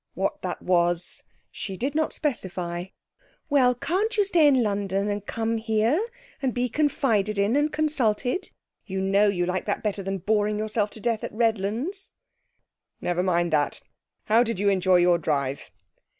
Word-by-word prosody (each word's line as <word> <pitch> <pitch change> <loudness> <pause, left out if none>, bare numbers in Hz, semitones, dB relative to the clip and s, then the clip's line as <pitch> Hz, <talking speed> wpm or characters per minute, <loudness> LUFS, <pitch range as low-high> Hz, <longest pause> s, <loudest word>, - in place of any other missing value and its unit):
What - - -2
that - - -4
was 175 -1 +1 0.3
she 195 -2 -6
did 270 +6 -2
not 315 0 0
specify. 180 - -3 0.7
'Well, 255 -3 +4
can't 380 - -1
you 410 - +4
stay 340 -6 +4
in 265 -4 +4
London 200 -1 -1
and 205 -1 -2
come 225 +2 -2
here, 225 - +1 0.4
and 260 -3 -1
be 250 0 0
confided 225 -8 +1
in 200 +5 +2
and 295 +1 +2
consulted? 290 - 0 0.3
You 190 -1 -4
know 195 +2 +3
you 180 -3 +1
like 180 +1 -2
that 205 - -2
better 205 -2 -1
than 195 0 -3
boring 210 +2 +1
yourself 215 0 -1
to - - -10
death 225 0 -1
at - - -4
Redlands.' 230 - -1 0.9
'Never 175 0 -1
mind 175 -2 +1
that. 145 -2 +1 0.5
How 225 +2 +4
did 230 -4 -1
you 200 +1 +2
enjoy 185 -1 +3
your 175 -1 +4
drive?' 140 -4 -2
210 Hz, 165 wpm, -25 LUFS, 190-250 Hz, 0.9 s, Well